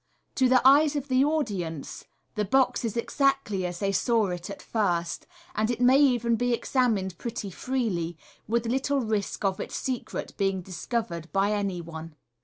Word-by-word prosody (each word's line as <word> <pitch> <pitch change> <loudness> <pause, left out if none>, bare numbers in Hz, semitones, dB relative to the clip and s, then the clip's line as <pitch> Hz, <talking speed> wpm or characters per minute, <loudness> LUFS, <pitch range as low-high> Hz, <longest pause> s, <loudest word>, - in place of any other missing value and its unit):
To 260 -2 +3
the 255 0 +5
eyes 290 +2 +6
of 285 -1 -3
the 260 +1 +4
audi 285 - 0
ence, 160 -3 -7 0.3
the 210 - -1
box 250 +5 +2
is 230 -1 -2
exactly 235 -7 +1
as 175 0 -6
they 195 +2 0
saw 225 0 +2
it 175 +1 -5
at 200 - -7
first, 175 -6 -1 0.3
and 215 +1 0
it 245 - -1
may 255 +2 +6
even 240 -5 +3
be 245 +1 +1
examined 220 -8 0
pretty 230 -4 -4
freely, 185 -9 -2 0.3
with 235 +2 0
little 270 +3 0
risk 215 -3 -2
of 190 -1 0
its - - -5
secret 255 -3 -4
being 195 -2 0
discovered 180 -3 -4
by 195 +1 +2
any 200 -4 -1
one. 160 -1 -9
220 Hz, 175 wpm, -27 LUFS, 190-255 Hz, 0.3 s, eyes